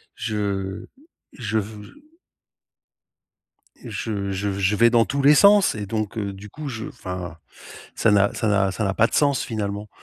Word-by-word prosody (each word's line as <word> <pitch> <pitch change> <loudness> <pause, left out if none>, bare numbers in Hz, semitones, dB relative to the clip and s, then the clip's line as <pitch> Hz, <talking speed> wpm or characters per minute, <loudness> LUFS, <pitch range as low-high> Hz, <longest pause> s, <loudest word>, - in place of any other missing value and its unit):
je 100 -4 -3 0.5
je 110 -2 -3
v 105 0 -7
je - - -14 1.9
je 100 -3 -4
je 100 +1 -2
je 100 +1 0
vais 115 +2 +5
dans 115 -1 +4
tous 140 +3 -2
les 145 +2 +7
sens 200 - +6
et 105 -2 -5
donc 110 0 -3
heu, 100 -2 -3
du 100 +2 -11
coup, 150 +4 -7
je 115 -3 -5
enfin, 90 -6 -7 0.6
ça 110 - +3
n'a 100 0 +3
ça 110 - -2
n'a 100 -2 +2
ça 105 - -3
n'a 95 -1 0
pas 115 +3 +3
de - - -14
sens 140 -2 +2
finalement. 105 -2 -4
105 Hz, 175 wpm, -23 LUFS, 100-115 Hz, 1.9 s, les